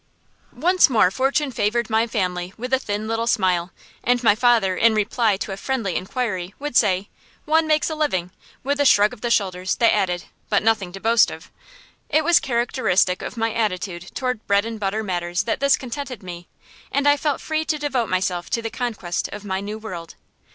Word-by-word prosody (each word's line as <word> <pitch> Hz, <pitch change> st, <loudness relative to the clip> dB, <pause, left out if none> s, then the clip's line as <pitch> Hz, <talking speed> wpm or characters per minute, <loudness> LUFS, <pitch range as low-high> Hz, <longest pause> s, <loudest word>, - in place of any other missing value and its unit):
Once 360 Hz, 0 st, +3 dB
more 215 Hz, -7 st, +4 dB
Fortune 270 Hz, +5 st, 0 dB
favored 230 Hz, +1 st, 0 dB
my 225 Hz, +1 st, +1 dB
family 180 Hz, -5 st, -2 dB
with 250 Hz, +3 st, -5 dB
a 265 Hz, -, +4 dB
thin 210 Hz, -3 st, -4 dB
little 225 Hz, +1 st, -1 dB
smile, 185 Hz, -5 st, +1 dB, 0.3 s
and 245 Hz, 0 st, +1 dB
my 220 Hz, -, +6 dB
father, 225 Hz, -4 st, +3 dB
in 225 Hz, +3 st, +4 dB
reply 215 Hz, 0 st, +1 dB
to 200 Hz, -, -5 dB
a 195 Hz, -, -5 dB
friendly 225 Hz, -6 st, -2 dB
inquiry, 190 Hz, -3 st, -3 dB
would 290 Hz, -2 st, -5 dB
say, 190 Hz, -1 st, +3 dB, 0.4 s
"One 315 Hz, +1 st, +3 dB
makes 310 Hz, -1 st, +2 dB
a 315 Hz, -, -2 dB
living," 185 Hz, -, -1 dB, 0.3 s
with 285 Hz, +2 st, -1 dB
a -, -, +4 dB
shrug 210 Hz, -3 st, +5 dB
of 235 Hz, -, -13 dB
the 240 Hz, -, -1 dB
shoulders 185 Hz, -4 st, 0 dB
that 230 Hz, -, +4 dB
added 180 Hz, -4 st, 0 dB, 0.3 s
"but 205 Hz, -1 st, +2 dB
nothing 215 Hz, -5 st, +1 dB
to 195 Hz, -, -7 dB
boast 230 Hz, +2 st, +4 dB
of." -, -, -10 dB, 0.6 s
It 310 Hz, +2 st, +3 dB
was 345 Hz, +1 st, +5 dB
characteristic 235 Hz, -7 st, +1 dB
of -, -, -6 dB
my 225 Hz, -1 st, 0 dB
attitude 185 Hz, -5 st, -2 dB
toward 250 Hz, -4 st, -2 dB
bread 200 Hz, +1 st, +3 dB
and 225 Hz, -1 st, -5 dB
butter 210 Hz, +2 st, -1 dB
matters 175 Hz, -2 st, -2 dB
that 225 Hz, -, -2 dB
this 280 Hz, 0 st, +4 dB
contented 255 Hz, -3 st, -6 dB
me, 175 Hz, -1 st, -8 dB, 0.4 s
and 280 Hz, +1 st, +1 dB
I 290 Hz, -, +6 dB
felt 290 Hz, -1 st, -1 dB
free 315 Hz, 0 st, -2 dB
to 310 Hz, -, 0 dB
devote 270 Hz, -6 st, -1 dB
myself 185 Hz, -1 st, -1 dB
to 230 Hz, -, -1 dB
the 225 Hz, -, -3 dB
conquest 215 Hz, -8 st, -3 dB
of 210 Hz, -, -9 dB
my 190 Hz, -1 st, -2 dB
new 210 Hz, +2 st, -5 dB
world. 180 Hz, -7 st, -8 dB
220 Hz, 200 wpm, -22 LUFS, 190-255 Hz, 0.6 s, my